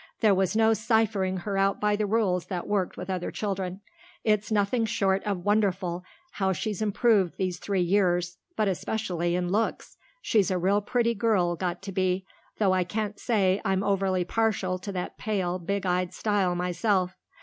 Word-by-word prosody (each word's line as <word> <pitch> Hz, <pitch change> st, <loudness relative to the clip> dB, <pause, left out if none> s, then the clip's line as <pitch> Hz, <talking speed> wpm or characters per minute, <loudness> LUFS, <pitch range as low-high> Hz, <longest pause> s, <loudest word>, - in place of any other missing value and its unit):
There 215 Hz, -2 st, +5 dB
was 190 Hz, +2 st, +1 dB
no 225 Hz, 0 st, +4 dB
ciphering 215 Hz, -4 st, +1 dB
her 195 Hz, +1 st, -2 dB
out 195 Hz, 0 st, +2 dB
by 210 Hz, 0 st, +2 dB
the 210 Hz, 0 st, -1 dB
rules 195 Hz, -5 st, +1 dB
that 180 Hz, -2 st, -4 dB
worked 200 Hz, -3 st, -1 dB
with 180 Hz, -, -6 dB
other 185 Hz, -2 st, -2 dB
children. 190 Hz, -2 st, -3 dB, 0.4 s
It's 210 Hz, -1 st, +1 dB
nothing 215 Hz, +3 st, +2 dB
short 195 Hz, -2 st, +1 dB
of 195 Hz, -4 st, -2 dB
wonderful 190 Hz, -4 st, +1 dB, 0.3 s
how 190 Hz, -1 st, 0 dB
she's 205 Hz, +4 st, -3 dB
improved 210 Hz, -3 st, +2 dB
these 185 Hz, -2 st, -2 dB
three 195 Hz, -3 st, 0 dB
years, 175 Hz, -1 st, +1 dB, 0.2 s
but 215 Hz, -, +1 dB
especially 180 Hz, -3 st, -1 dB
in 180 Hz, 0 st, -1 dB
looks. 220 Hz, +3 st, -1 dB, 0.2 s
She's 215 Hz, -, +2 dB
a 185 Hz, -, +1 dB
real 195 Hz, +4 st, +2 dB
pretty 235 Hz, +2 st, +1 dB
girl 200 Hz, -6 st, +1 dB
got 180 Hz, +1 st, -3 dB
to 195 Hz, -, -5 dB
be, 185 Hz, 0 st, 0 dB, 0.3 s
though 195 Hz, -3 st, +3 dB
I 185 Hz, -1 st, +2 dB
can't 210 Hz, +2 st, -3 dB
say 200 Hz, -5 st, +2 dB
I'm 195 Hz, -2 st, +1 dB
overly 195 Hz, -2 st, +1 dB
partial 195 Hz, -3 st, 0 dB
to 200 Hz, +2 st, -6 dB
that 180 Hz, -2 st, -5 dB
pale, 185 Hz, -4 st, -1 dB
big 200 Hz, +3 st, -2 dB
eyed 180 Hz, 0 st, 0 dB
style 200 Hz, -4 st, +1 dB
myself. 180 Hz, +1 st, 0 dB
195 Hz, 175 wpm, -27 LUFS, 180-210 Hz, 0.4 s, There